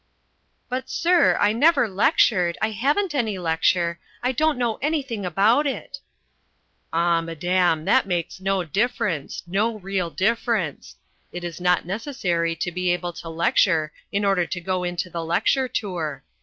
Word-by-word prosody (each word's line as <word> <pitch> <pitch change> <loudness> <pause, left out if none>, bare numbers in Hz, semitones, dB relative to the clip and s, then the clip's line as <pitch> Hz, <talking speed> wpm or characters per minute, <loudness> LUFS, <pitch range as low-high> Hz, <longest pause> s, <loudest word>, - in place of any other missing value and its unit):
"But, 260 +1 -4
sir, 345 0 +3
I 205 +1 +3
never 290 +1 +4
lectured, 190 - +2
I 220 - 0
haven't 290 - 0
any 225 -8 -1
lecture, 170 0 +1 0.2
I 250 - +2
don't 310 +3 +1
know 240 -3 0
anything 270 - -2
about 220 - +3
it." 280 +1 -5 0.9
"Ah, 170 0 +2
madam, 165 0 0
that - - +3
makes 175 0 -2
no 190 -1 0
difference 175 - -2
no 210 +6 0
real 190 -3 -2
difference. 215 - -1 0.4
It 175 0 -6
is 175 0 -6
not 180 -1 +2
necessary 180 - -1
to 175 +2 -3
be 180 +1 -1
able 175 0 -2
to 165 - -8
lecture 165 -1 +2 0.2
in 200 +1 0
order 195 -3 +2
to 180 - -4
go 185 +1 -2
into 175 0 -2
the 170 -2 -5
lecture 255 +10 +1
tour. 165 - -4
185 Hz, 150 wpm, -23 LUFS, 170-230 Hz, 0.9 s, never